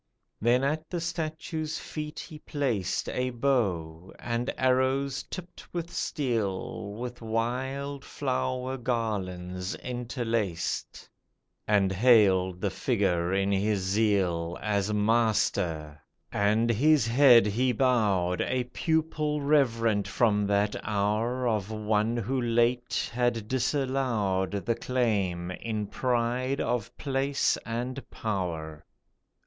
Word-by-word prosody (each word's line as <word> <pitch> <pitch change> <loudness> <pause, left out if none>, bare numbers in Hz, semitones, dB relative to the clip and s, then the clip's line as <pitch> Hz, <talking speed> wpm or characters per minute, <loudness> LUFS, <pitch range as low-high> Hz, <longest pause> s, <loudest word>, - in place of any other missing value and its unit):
Then 120 +4 +3
at 155 +3 -1
the 175 - -2
statue's 160 -1 -3
feet 150 -1 -6
he 155 -3 -9
placed 125 - -1
A 125 0 -1
bow, 95 -10 -1
and 120 +1 -2
arrows 130 +1 +1
tipped 180 -1 -9
with 170 0 -3
steel, 110 - -2
With 120 +2 -6
wild 130 +5 -2
flower 130 -1 -2
garlands 95 -6 -2
interlaced, 115 -7 -3 0.6
And 100 -2 +3
hailed 95 -4 +4
the 100 - 0
figure 95 -6 0
in 95 +1 +1
his 100 +1 +1
zeal 95 -4 +1
As 105 -1 0
Master, 100 -8 +1 0.3
and 110 +3 +2
his 145 +3 +4
head 120 -2 +7
he 120 +5 +1
bowed, 105 -8 +2
A 130 -1 0
pupil 155 -2 0
reverent 115 -8 +2
from 105 -2 +2
that 100 +1 +1
hour 110 +5 0
Of 105 -3 0
one 110 +1 0
who 125 +4 -1
late 120 +1 +1
had 120 -3 0
disallowed 120 - 0
The 115 - +2
claim, 105 -8 -1
in 110 +2 -3
pride 125 +4 0
of 120 -4 -1
place 140 0 +1
and 125 +4 -4
power. 85 -7 -4
115 Hz, 110 wpm, -28 LUFS, 100-130 Hz, 0.6 s, head